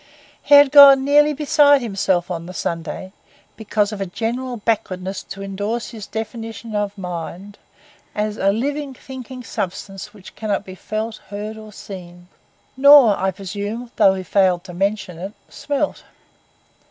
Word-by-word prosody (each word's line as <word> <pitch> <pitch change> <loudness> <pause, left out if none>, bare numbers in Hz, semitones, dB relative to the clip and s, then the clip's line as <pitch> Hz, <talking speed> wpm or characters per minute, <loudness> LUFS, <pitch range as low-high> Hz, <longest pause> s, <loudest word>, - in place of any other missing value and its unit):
He 290 - +5
had 285 -1 +7
gone 280 -2 +9
nearly 295 +1 +5
beside 290 -2 +4
himself 190 -5 0
on 170 -1 -5
the 185 - -9
Sunday, 170 +3 -4 0.4
because 210 -1 -1
of 210 -2 -6
a 195 - -2
general 240 +6 -3
backwardness 195 -4 -2
to 195 0 -8
indorse 205 +4 -4
his 215 -4 -9
definition 225 0 -6
of 205 0 -2
mind 180 +2 -7 0.6
as 210 0 -1
'a 195 -2 +2
living, 280 +5 -3
thinking 260 -1 -9
substance 195 -1 -5
which 205 -3 -14
cannot 210 -2 -2
be 185 - -9
felt, 215 +3 -4
heard, 210 +2 -6
or 215 -1 -11
seen'—nor, 200 +8 +2
I 190 +1 0
presume, 205 +5 -6
although 195 -3 +6
he 190 - -5
failed 185 -1 +2
to 185 -2 -10
mention 195 -2 -2
it, 190 +4 -6 0.2
smelt. 290 0 -3
210 Hz, 145 wpm, -20 LUFS, 190-245 Hz, 0.6 s, gone